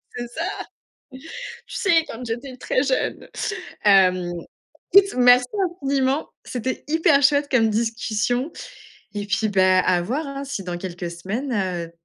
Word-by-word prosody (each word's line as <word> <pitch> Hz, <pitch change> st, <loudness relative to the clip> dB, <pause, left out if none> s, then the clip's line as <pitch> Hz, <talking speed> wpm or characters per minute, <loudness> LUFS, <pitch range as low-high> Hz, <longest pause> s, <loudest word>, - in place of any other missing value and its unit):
C'est 240 Hz, 0 st, -4 dB
ça, 330 Hz, +11 st, -4 dB, 0.5 s
tu 260 Hz, 0 st, -11 dB, 0.5 s
sais? 345 Hz, -8 st, +2 dB
Quand 230 Hz, +2 st, -7 dB
j'étais 245 Hz, +3 st, -5 dB
très 255 Hz, -, 0 dB
jeune, 265 Hz, -2 st, -1 dB, 0.6 s
hem, 185 Hz, -3 st, +4 dB, 0.6 s
écoute, 395 Hz, +1 st, +7 dB
merci 245 Hz, 0 st, +6 dB, 0.4 s
infiniment, 275 Hz, +1 st, 0 dB
c'était 255 Hz, +1 st, -4 dB
hyper 305 Hz, -2 st, +3 dB
chouette 285 Hz, 0 st, +3 dB
comme 225 Hz, -4 st, +3 dB
discussion 230 Hz, +4 st, -1 dB, 0.6 s
et 205 Hz, 0 st, -3 dB
puis, 210 Hz, +1 st, 0 dB
bah, 185 Hz, -1 st, +4 dB
à 180 Hz, -1 st, +2 dB
voir, 280 Hz, -, -2 dB
hein, 275 Hz, 0 st, -5 dB
si 265 Hz, -8 st, -5 dB
dans 175 Hz, -1 st, -4 dB
quelques 175 Hz, -1 st, -5 dB
semaines, 205 Hz, +11 st, -4 dB
heu, 180 Hz, -5 st, -2 dB
245 Hz, 140 wpm, -22 LUFS, 195-275 Hz, 0.6 s, écoute